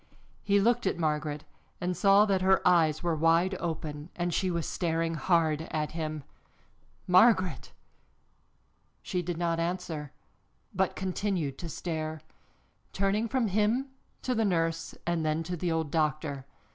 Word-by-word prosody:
He 200 0 +3
looked 235 +1 +2
at - - 0
Margaret 150 -2 -1 0.4
and 180 0 -1
saw 200 +2 +5
that 195 -3 +1
her 190 0 +3
eyes 160 -3 +3
were 170 -2 +1
wide 165 +4 +3
open 155 -2 -4
and 175 0 -1
she 190 +2 +1
was 170 -2 -1
staring 165 -1 -1
hard 160 -1 +1
at 155 -1 -2
him. 155 -2 -4 0.8
"Margaret!" 185 0 +4 1.3
She 180 -2 -2
did 175 -1 -4
not 170 -1 0
answer, 165 -4 -3 0.6
but 190 0 0
continued 185 -6 -2
to 170 - -6
stare, 160 -1 -4 0.7
turning 200 +3 +1
from 255 0 0
him 215 +7 +1 0.3
to 255 - 0
the 225 -2 +1
nurse 165 -4 0
and 170 -2 0
then 155 +1 0
to 180 +2 -4
the 175 0 -2
old 160 -3 -1
doctor. 150 -3 -1
170 Hz, 145 wpm, -29 LUFS, 155-190 Hz, 1.3 s, saw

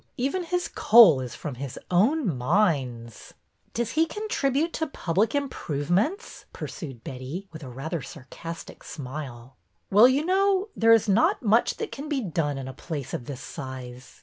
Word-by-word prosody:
Even 280 +9 -1
his 355 +1 -1
coal 210 - +7
is 125 -2 -6
from 145 +3 -5
his 130 0 -7
own 210 - +3
mines." 125 - -1 0.2
'' - - -41
Does 235 -1 -1
he 320 +1 +2
contribute 330 - -1
to 320 - -1
public 205 - 0
improvements? 210 - -1
" - - -42
pursued 135 - -7
Betty, 135 +9 -6
with 160 -1 -10
a 135 - -8
rather 150 +6 -4
sarcastic 165 +4 -9
smile. 130 -3 -8 0.3
''Well, 220 +6 +8
you 285 +4 +1
know, 390 +2 +2
there 225 0 +4
is 225 -1 +5
not 210 +5 +3
much 225 +2 +3
that - - -4
can 280 +6 -7
be 290 -3 0
done 165 - -1
in 135 -1 -5
a 130 - -6
place 145 -1 -6
of 120 - -4
this 135 -2 -6
size. 130 -2 -8
175 Hz, 170 wpm, -26 LUFS, -, 0.3 s, Well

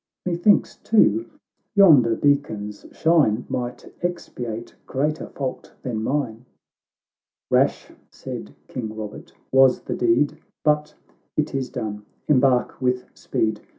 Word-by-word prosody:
C29 180 - 0
Methinks, 175 +4 +3
too, 115 - +3 0.5
yonder 145 - +7
beacon's 110 -8 0
shine 145 -9 +3
Might 120 -1 -5
expiate 120 -10 -4
greater 150 +4 -1
fault 130 -2 -5
than 115 -4 -2
mine."— 125 -3 -2 0.5
" - - -54
Rash," - - +2 0.2
said 70 +1 -8
King 120 -4 -4
Eobert, 110 -1 -8
" - - -43
was 135 -1 +5
the - - -4
deed 120 +5 +2
— - - -62
But 150 0 +2 0.4
it 150 - 0
is 135 -2 -2
done. 105 -1 -5
— - - -42
Embark 130 -3 +3
with 125 0 0
speed! 110 -1 -1
125 Hz, 130 wpm, -23 LUFS, 110-150 Hz, 0.5 s, yonder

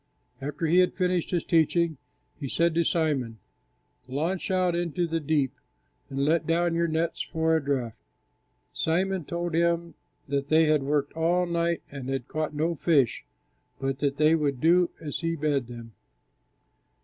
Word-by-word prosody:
After 145 +4 -3
He 170 +3 +4
had 180 - +3
finished 180 -2 0
His 175 -3 0
teaching, 165 -1 +2 0.4
He 140 -3 -4
said 170 +3 +2
to 170 +1 +2
Simon, 145 -9 0 0.7
"Launch 165 +10 -2
out 185 -2 +2
into 175 0 -1
the 165 0 -1
deep 145 -3 0 0.6
and 135 +1 -1
let 160 +3 +2
down 170 +1 +2
your 170 0 +1
nets 160 +1 -1
for 160 0 0
a 160 - 0
draught." 130 -5 -1 0.8
Simon 185 +1 0
told 170 +1 -3
Him 170 0 +1 0.3
that 140 0 -1
they 160 +1 +4
had 155 -2 +3
worked 140 +1 0
all 170 +2 +1
night 170 -1 -1
and 135 -2 -6
had 135 -2 -3
caught 155 -1 -3
no 160 +3 0
fish, 150 -6 +2 0.6
but 135 0 -2
that 140 -1 0
they 155 +1 +4
would 145 -5 0
do 175 +3 +4
as 145 -3 -4
He 165 0 -1
bade 145 -5 0
them. 120 -1 -9
160 Hz, 160 wpm, -27 LUFS, 140-170 Hz, 0.8 s, He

